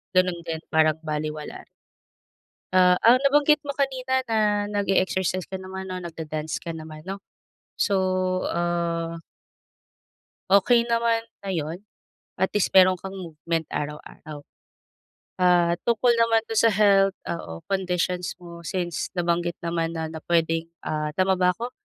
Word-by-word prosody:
ganun 185 -1 +3
din, 160 -1 -4
parang 155 0 +3
balewala. 155 -1 -5 1.1
Ah, 180 -1 +5
ang 245 +3 +7
nabanggit 295 +2 +4
mo 290 - -11
kanina 260 -1 0
na 210 -2 +1
nag-e-exercise 190 -3 0
ka 190 0 -7
naman 190 0 -7
'no, 185 -1 -5
nagda-dance 160 -2 -5
ka 170 -2 -6
naman 155 -1 -9
'no. 195 +1 -6 0.6
So, 200 - +2 0.6
ah 170 -1 -1 1.4
Okey 235 +5 +5
naman 230 -1 +1 0.2
na 195 - -7
'yon. 160 +2 -3 0.6
At 190 +1 +1
least 205 - +2
mayro'n 185 -1 +7
kang 195 +2 -8
movement 165 -2 -4
araw-araw. 150 0 -6 1.0
Ah, 175 -1 +4
tungkol 235 +1 +3
naman 230 -1 +3
to 225 - -4
sa 230 +1 +5
health 195 -1 +4
oo, 85 - -5
conditions 180 -2 -1
mo 170 -1 -11
since 175 -1 -3
nabanggit 175 0 0
naman 170 -1 -2
na 160 -1 -3
na 160 0 -7
puwedeng 165 -1 +1 0.2
ah, 150 0 -2
tama 190 0 +3
ba 180 0 +3
ako? 235 +7 -6
180 Hz, 135 wpm, -25 LUFS, 165-205 Hz, 1.4 s, ang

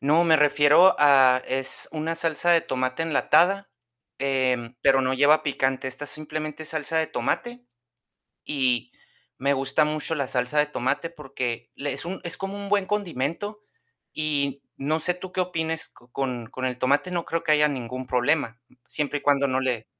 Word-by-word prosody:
No, 155 +5 +3
me 160 -2 +5
refiero 150 +4 +5
a 135 -3 +6
es 130 0 -2
una 160 +1 -2
salsa 165 +1 0
de 170 - +5
tomate 130 +2 -2
enlatada, 180 +5 +2 0.5
em, 130 -3 0
pero 135 -1 +5
no 130 0 0
lleva 150 +3 +4
picante. 135 -3 -1
Esta 130 +3 -7
es - - -3
simplemente 155 0 -5
salsa 155 +1 -2
de 160 - +1
tomate 245 0 -3 0.8
y 130 -5 0 0.5
me 140 +2 +1
gusta 135 +3 +2
mucho 155 +1 -2
la 140 -4 -2
salsa 125 +4 0
de 150 - +4
tomate 140 +3 -2
porque 130 -7 -5
le 145 0 -3
es - - -1
un, 185 +2 -5
es 175 0 -1
como 195 +1 -5
un 200 0 -7
buen 200 -1 +2
condimento 205 +2 -3 0.5
y 140 -3 -1
no 155 +4 -1
sé 180 +3 +1
tú 185 +1 -9
qué 185 - 0
opines 165 -3 -3
co 120 0 -23
con 125 -4 -3
con 130 0 -5
el 125 -1 -2
tomate 140 +8 +1
no 175 -2 -2
creo 165 0 -2
que 160 - +1
haya 150 0 +4
ningún 130 -2 -5
problema, 125 -2 0 0.3
siempre 145 0 -2
y - - -20
cuando 140 -1 +3
no 130 0 0
le 125 -4 -1
145 Hz, 180 wpm, -25 LUFS, 130-165 Hz, 0.8 s, a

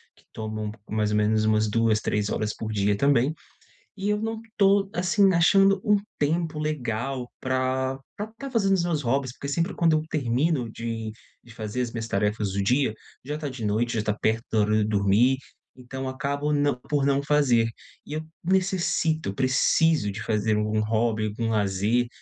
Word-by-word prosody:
que - - -25
tomam 110 -1 -4 0.2
mais 105 -1 0
ou 105 - +2
menos 110 +1 +2
umas 110 0 +2
2, 115 0 +2
3 105 -1 0
horas 105 0 -1
por 110 -1 -5
dia 100 0 +2
também. 140 +3 +3 0.6
E 200 +1 -1
eu 210 0 0
não 225 0 -3 0.2
tô, 195 0 +3
assim, 185 +2 +3
achando 195 +3 +4
um 210 -1 +4 0.2
tempo 160 +1 0
legal 130 -4 -3
pra 130 +1 -1 0.2
pra 210 - -4
tá 235 +5 -9
fazendo 200 -6 +2
os 185 - +1
meus 165 -4 -1
hobbies, 130 +1 0
porque 140 - -7
sempre 170 +7 0
quando 165 -2 +3
eu 155 - 0
termino 135 -1 0
de 115 -1 -5 0.3
de 115 -1 -15
fazer 110 +2 -4
as 120 -2 -4
minhas 115 -1 -4
tarefas 105 0 0
do 100 +1 -1
dia, 125 +4 +2 0.3
já 150 +3 -4
tá 150 -2 -4
de 130 -4 -6
noite, 110 +3 0
já 110 - 0
tá 105 0 0
perto 110 +1 +1
da 110 - +2
hora 105 0 +2
de 110 - +4
eu 105 - 0
dormir, 105 +5 +3 0.4
então 130 +1 -6
acabo 140 +2 -2
não 145 -1 +2
por 145 -2 +1
não 140 0 +2
fazer. 140 -6 +3 0.4
E 150 - -7
eu 155 +1 -4 0.2
necessito, 175 - +1
preciso 130 +2 +2
de 100 +2 -6
fazer 110 -1 0
algum 105 0 0
hobby, 110 0 0
algum 115 +2 -2
lazer 105 +3 +1
125 Hz, 185 wpm, -25 LUFS, 110-155 Hz, 0.6 s, achando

